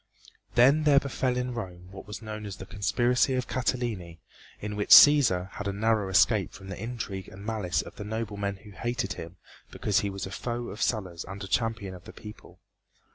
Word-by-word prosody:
Then 140 +6 +5
there 145 -2 +6
befell 130 -2 -1
in 125 0 -2
Rome 90 -6 -7
what 95 -1 -10
was 105 +1 -7
known 105 -1 -6
as 100 - -6
the 95 - -9
conspiracy 120 +6 +1
of 125 -1 -2
Catiline, 115 -10 -2 0.4
in 105 0 -5
which 105 0 -3
Cæsar 115 -12 +8
had 105 - -6
a - - 0
narrow 105 0 +1
escape 100 +1 +3
from 95 0 -11
the 95 - -6
intrigue 110 -5 -5
and 100 +2 -11
malice 100 -8 -1
of - - -12
the - - -5
noblemen 105 -2 -3
who 105 +2 -15
hated 120 -2 -3
him 85 +2 -9 0.3
because 105 -2 0
he 100 - -1
was 95 -1 -5
a 95 - -8
foe 120 +4 -4
of 105 - -8
Sulla's 95 -7 -1
and 100 +1 -8
a - - -5
champion 110 -2 -1
of 90 -1 -12
the - - -11
people. 105 0 -12
105 Hz, 200 wpm, -28 LUFS, 95-120 Hz, 0.4 s, Cæsar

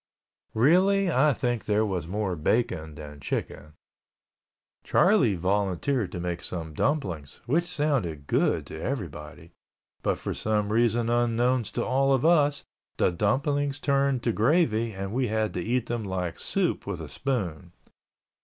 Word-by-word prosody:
Really 185 - +4
I 150 +2 +4
think 120 -4 -2
there 105 +1 +2
was 90 -6 -3
more 100 0 -2
bacon 80 -3 -1
than 75 -1 -10
chicken. 75 +2 -5 1.1
Charlie 145 - +3
Russell 85 - -8
volunteered 100 - 0
to 90 - -5
make 85 0 -3
some 80 -3 -6
dumplings, 90 - -2
which 165 +7 +1
sounded 120 - -1
good - - +1
to 80 - -8
everybody, 80 - -6 0.5
but - - 0
for - - -4
some 105 -1 -1
reason 115 0 +2
unknown 120 +1 +2
to 110 - -3
all 135 +2 +2
of 135 +2 +1
us, 150 -4 +3 0.3
the - - +3
dumplings 140 - 0
turned 140 -3 +1
to 120 - +2
gravy 115 -2 +2
and 95 0 -5
we 130 0 +1
had 110 0 -1
to 90 - -2
eat 120 +5 0
them 120 -2 -3
like 90 -3 -3
soup - - -1
with - - -3
a - - -6
spoon. 90 - -3
110 Hz, 150 wpm, -27 LUFS, 90-135 Hz, 1.1 s, Really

